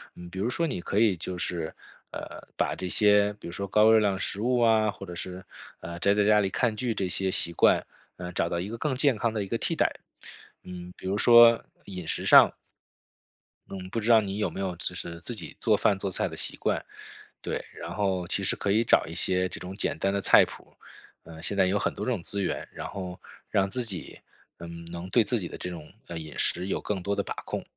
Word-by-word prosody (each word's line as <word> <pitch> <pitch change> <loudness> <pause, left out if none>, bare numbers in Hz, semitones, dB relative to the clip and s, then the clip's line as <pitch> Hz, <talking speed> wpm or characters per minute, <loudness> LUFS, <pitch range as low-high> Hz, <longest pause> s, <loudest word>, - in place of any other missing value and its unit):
嗯， 90 - -10
比 95 - -6
如 110 +5 0
说 170 - 0
你 140 - -3
可 95 +3 -3
以 105 -5 +4
就 90 +2 -5
是， 85 -1 -3 0.4
呃， - - -8
把 - - +1
这 90 - -4
些 105 +1 +4
比 105 - -15
如 - - -6
说 100 +3 -4
高 105 +3 +5
热 110 - +7
量 100 -2 +1
食 100 +1 -4
物 125 +2 +2
啊， 110 -2 +4
或 100 -1 -7
者 90 - -8
是 90 +1 -7 0.4
呃， 85 +1 -7
宅 100 +2 +4
在 105 0 +2
家 105 0 +5
里 95 -2 +1
看 115 +2 +1
剧 120 +1 -1
这 95 -3 -1
些 95 +1 0
习 85 - 0
惯， 85 - +3 0.3
呃， 90 0 -6
找 85 - 0
到 85 - -2
一 95 +4 -4
个 115 - -5
更 135 +2 -1
健 135 -2 +2
康 115 +1 0
的 105 -2 -1
一 95 - -7
个 - - -1
替 - - -2
代。 - - +2 0.7
嗯， 90 0 -9
比 - - -12
如 95 +2 0
说 120 +1 +7 0.2
饮 90 -4 -7
食 - - -1
上， - - +8 1.2
嗯， 95 -1 -7
不 115 - -1
知 110 - -2
道 115 -1 +8
你 100 -1 -4
有 105 - +1
没 - - -8
有 95 -2 -2
就 90 - -2
是 85 -1 -6
自 - - -5
己 - - -9
做 - - +3
饭 100 - +2
做 100 - -2
菜 95 - -1
的 - - -8
习 - - -4
惯， - - -1 0.6
对， - - -3
然 85 - -7
后 95 -2 0
其 100 - 0
实 - - +3
可 100 - -1
以 110 +3 +4
找 115 - +4
一 80 - -8
些 90 +1 +1
这 - - -7
种 90 +1 -7
简 - - -2
单 100 0 +1
的 100 - 0
菜 - - +6
谱， - - -14 0.5
呃， 80 -1 -11
现 100 - -2
在 95 - +5
有 95 +2 +1
很 - - -1
多 - - -5
这 130 - 0
种 95 -8 -2
资 100 +4 -3
源， 95 - -2
然 - - -6
后 90 -2 -7 0.3
让 95 0 +1
自 125 +5 -2
己， 95 -6 -6 0.4
嗯， 85 0 -9
能 85 +1 -6
对 115 +3 +4
自 120 +3 +1
己 90 - -4
的 - - -9
这 - - -5
种， 80 -3 -9 0.2
呃， 85 - -6
饮 80 -1 -9
食 90 +2 0
有 - - -2
更 100 -3 -3
多 100 +1 -1
的 100 - -1
把 - - -4
控。 - - -4
95 Hz, 270 characters per minute, -27 LUFS, 90-105 Hz, 1.2 s, 上